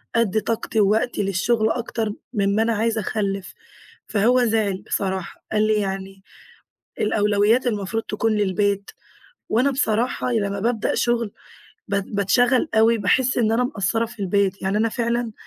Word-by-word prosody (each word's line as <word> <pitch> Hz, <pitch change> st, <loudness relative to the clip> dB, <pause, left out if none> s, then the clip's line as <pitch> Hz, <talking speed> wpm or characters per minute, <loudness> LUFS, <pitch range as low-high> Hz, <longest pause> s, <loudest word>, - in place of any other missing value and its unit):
أدّي 220 Hz, -2 st, +2 dB
طاقتي 225 Hz, 0 st, -2 dB
ووقتي 215 Hz, +3 st, +2 dB
للشغل 215 Hz, +4 st, +1 dB
أكتر 225 Hz, -3 st, -2 dB, 0.2 s
من 200 Hz, -2 st, +1 dB
ما 220 Hz, -, +2 dB
أنا 230 Hz, 0 st, +1 dB
عايزة 225 Hz, +1 st, 0 dB
أخلِّف"، 195 Hz, -2 st, -3 dB, 0.5 s
فهو 240 Hz, +4 st, +3 dB
زعل 215 Hz, -4 st, 0 dB
بصراحة، 190 Hz, -2 st, -3 dB
قال 215 Hz, 0 st, +2 dB
لي: 215 Hz, -, +3 dB
"يعني 195 Hz, -2 st, -3 dB, 0.8 s
الأولويات 210 Hz, +3 st, +2 dB
المفروض 220 Hz, 0 st, -1 dB
تكون 220 Hz, +1 st, -1 dB
للبيت"، 200 Hz, -1 st, 0 dB, 0.6 s
وأنا 255 Hz, +5 st, +2 dB
بصراحة 245 Hz, 0 st, 0 dB
لمّا 200 Hz, -3 st, -1 dB
بابدأ 225 Hz, 0 st, 0 dB
شغل 235 Hz, -3 st, 0 dB, 0.6 s
ب 200 Hz, -, -1 dB, 0.2 s
باتشغل 245 Hz, -, +2 dB
أوي، 225 Hz, +1 st, +4 dB
باحس 250 Hz, +6 st, +2 dB
إن 220 Hz, -2 st, +2 dB
أنا 235 Hz, +2 st, +2 dB
مقصرة 225 Hz, -2 st, 0 dB
في 230 Hz, -1 st, -13 dB
البيت. 195 Hz, 0 st, 0 dB
يعني 195 Hz, +2 st, 0 dB
أنا 225 Hz, +1 st, +2 dB
فعلًا 235 Hz, 0 st, -1 dB
215 Hz, 145 wpm, -22 LUFS, 200-230 Hz, 0.8 s, أوي